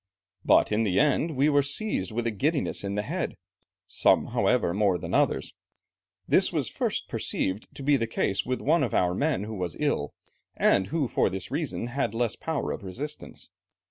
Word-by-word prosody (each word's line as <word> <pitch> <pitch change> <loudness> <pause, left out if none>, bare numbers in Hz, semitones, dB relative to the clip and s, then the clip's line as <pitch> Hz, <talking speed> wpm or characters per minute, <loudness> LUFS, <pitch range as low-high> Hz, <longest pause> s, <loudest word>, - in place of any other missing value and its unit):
But - - +4
in 105 +2 +2
the 95 -4 +2
end, 150 +1 +2
we 140 +3 +4
were 145 -1 +4
seized 145 - -1
with 120 +2 -2
a 115 - +1
giddiness 140 - 0
in 100 0 -3
the 105 - -1
head, - - -3 0.5
some - - +2
however, 85 - +2
more 100 -2 +2
than - - -6
others; - - +1 0.7
this - - +3
was - - -1
first - - -2
perceived 95 +3 -2
to 140 - -7
be 145 0 +4
the 115 -2 -1
case 100 -2 0
with 130 0 -2
one 160 +3 +3
of 125 -6 0
our 90 -1 +2
men 140 0 0
who 110 +1 -6
was 90 -4 -4
ill, 145 - -1 0.4
and 95 -1 +3
who 150 +2 0
for - - +1
this 95 +5 -6
reason, 145 -4 -2
had 120 -2 -2
less 115 -1 0
power 160 -3 -3
of - - -5
resistance. 140 +11 -7
120 Hz, 190 wpm, -27 LUFS, 100-145 Hz, 0.7 s, But